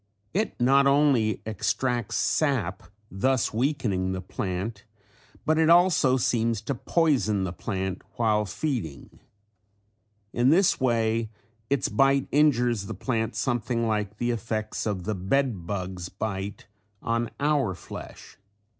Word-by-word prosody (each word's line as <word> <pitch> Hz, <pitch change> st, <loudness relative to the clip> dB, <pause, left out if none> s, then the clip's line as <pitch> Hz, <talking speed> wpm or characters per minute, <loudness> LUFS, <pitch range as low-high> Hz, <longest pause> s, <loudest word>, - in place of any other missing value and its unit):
It 210 Hz, +5 st, -1 dB
not 135 Hz, +3 st, +4 dB
only 140 Hz, -6 st, +3 dB
extracts 115 Hz, +2 st, -1 dB
sap 115 Hz, -, 0 dB, 0.3 s
thus 130 Hz, +6 st, +1 dB
weakening 110 Hz, -7 st, 0 dB
the 95 Hz, -, -4 dB
plant 100 Hz, +3 st, -4 dB, 0.6 s
but 155 Hz, +1 st, +2 dB
it 160 Hz, 0 st, +4 dB
also 170 Hz, -7 st, +5 dB
seems 115 Hz, -2 st, +1 dB
to 120 Hz, +5 st, -2 dB
poison 120 Hz, -, +1 dB
the 90 Hz, -2 st, -3 dB
plant 95 Hz, -2 st, -3 dB
while 105 Hz, -2 st, +2 dB
feeding. 110 Hz, -, -4 dB, 1.1 s
In 120 Hz, +2 st, +3 dB
this 180 Hz, +5 st, +4 dB
way 115 Hz, -2 st, +1 dB, 0.4 s
its 140 Hz, -1 st, +1 dB
bite 135 Hz, +5 st, +2 dB
injures 120 Hz, -8 st, +2 dB
the 110 Hz, -, -5 dB
plant 115 Hz, +2 st, -2 dB
something 120 Hz, -2 st, -1 dB
like 105 Hz, -2 st, -1 dB
the 120 Hz, +1 st, 0 dB
effects 110 Hz, -1 st, -3 dB
of 100 Hz, -4 st, -2 dB
the 105 Hz, +4 st, -2 dB
bed 100 Hz, -1 st, -1 dB
bug's 95 Hz, -2 st, -4 dB
bite 100 Hz, 0 st, -5 dB, 0.4 s
on 115 Hz, 0 st, 0 dB
our 140 Hz, -9 st, +1 dB
flesh. -, -, -10 dB
115 Hz, 125 wpm, -26 LUFS, 100-135 Hz, 1.1 s, also